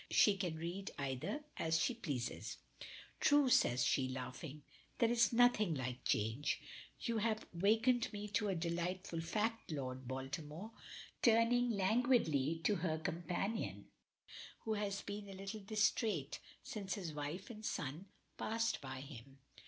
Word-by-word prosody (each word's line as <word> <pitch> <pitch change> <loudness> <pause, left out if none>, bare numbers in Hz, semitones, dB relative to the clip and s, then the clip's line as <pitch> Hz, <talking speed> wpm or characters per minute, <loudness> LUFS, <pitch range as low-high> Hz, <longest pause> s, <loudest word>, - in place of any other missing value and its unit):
She 205 - +6
can 180 -4 -2
read 175 +5 -4
either 140 - -2
as 160 0 +2
she 250 - +2
pleases. 145 - -3 0.6
"True!" 290 -2 +5
says 120 - +4
she 130 -2 +2
laughing. 130 +3 -6 0.3
"There 230 -1 +4
is 235 -1 +4
nothing 230 -7 +4
like 130 -2 -3
change. 110 +7 +1 0.4
You 230 -3 0
have 220 0 0
wakened 225 +7 +3
me 210 -1 -4
to 210 +1 +1
a 195 - +1
delightful 170 +1 -2
fact. 220 +4 -1
Lord 130 -3 -4
Baltimore," 150 - -5 0.5
turning 235 +1 +5
languidly 195 - +2
to 205 - +3
her 165 -2 0
companion, 175 +7 -2 0.7
who 220 - -1
has 205 -1 -2
been 205 0 -5
a - - -7
little 195 +3 -5
distrait 210 - +1 0.2
since 195 -3 -3
his 175 -7 -4
wife 150 +8 -4
and 215 -1 -9
son 150 +1 -3 0.3
passed 225 +1 0
by 130 -1 -5
him. 135 -1 -10
185 Hz, 135 wpm, -38 LUFS, 145-220 Hz, 0.7 s, She